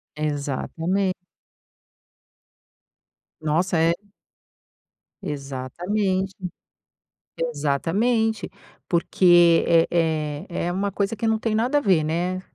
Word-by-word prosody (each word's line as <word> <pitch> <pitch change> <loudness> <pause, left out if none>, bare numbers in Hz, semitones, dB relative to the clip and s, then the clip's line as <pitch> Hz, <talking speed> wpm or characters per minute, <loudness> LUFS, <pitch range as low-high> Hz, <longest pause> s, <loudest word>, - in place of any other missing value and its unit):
Exatamente. 155 +6 -1 2.3
Nossa! 165 +4 +1
É 165 +1 +4 1.3
Exatamente, 175 +8 -2 1.0
exatamente. 180 - 0 0.4
Porque, 175 -1 +4
é 165 -1 +4 0.6
é 170 - -3
é - - 0
uma 200 +2 -1
coisa 200 +2 -1
que 225 - -3
não 220 0 +2
tem 220 -1 -1
nada 250 +6 +2
a - - -6
ver, 185 - +3
né. 175 +4 -1
175 Hz, 85 wpm, -23 LUFS, 160-200 Hz, 2.3 s, É